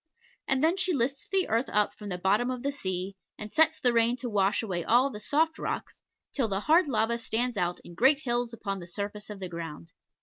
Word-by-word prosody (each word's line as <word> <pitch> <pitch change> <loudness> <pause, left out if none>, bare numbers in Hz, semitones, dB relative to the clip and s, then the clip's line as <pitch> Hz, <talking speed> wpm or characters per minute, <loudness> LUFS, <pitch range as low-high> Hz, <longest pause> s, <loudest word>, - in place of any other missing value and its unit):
And 265 +1 +2
then 335 +4 +3
she 375 -1 +1
lifts 270 0 -1
the 385 -1 +3
earth 230 +4 0
up 210 0 +2
from 210 -1 -9
the 180 - -3
bottom 205 +7 +2
of 255 -1 -4
the 280 - 0
sea, 190 -7 -4 0.2
and 210 0 -8
sets 320 0 +4
the 245 -1 +2
rain 235 +1 +3
to 245 -2 -5
wash 200 +2 +2
away 180 -5 -2
all 250 +7 +3
the 210 - -7
soft 315 +8 +1
rocks, - - -4 0.3
till 265 -5 +1
the 195 -1 -2
hard 325 - +4
lava 235 -2 +1
stands 240 +1 0
out 175 -2 -1
in 175 - -12
great 265 - +4
hills 240 -3 -1
upon 200 -4 -4
the 175 - -9
surface 205 +4 -5
of 210 -2 -7
the 185 - -4
ground. 165 - -7
230 Hz, 230 wpm, -28 LUFS, 195-265 Hz, 0.3 s, sets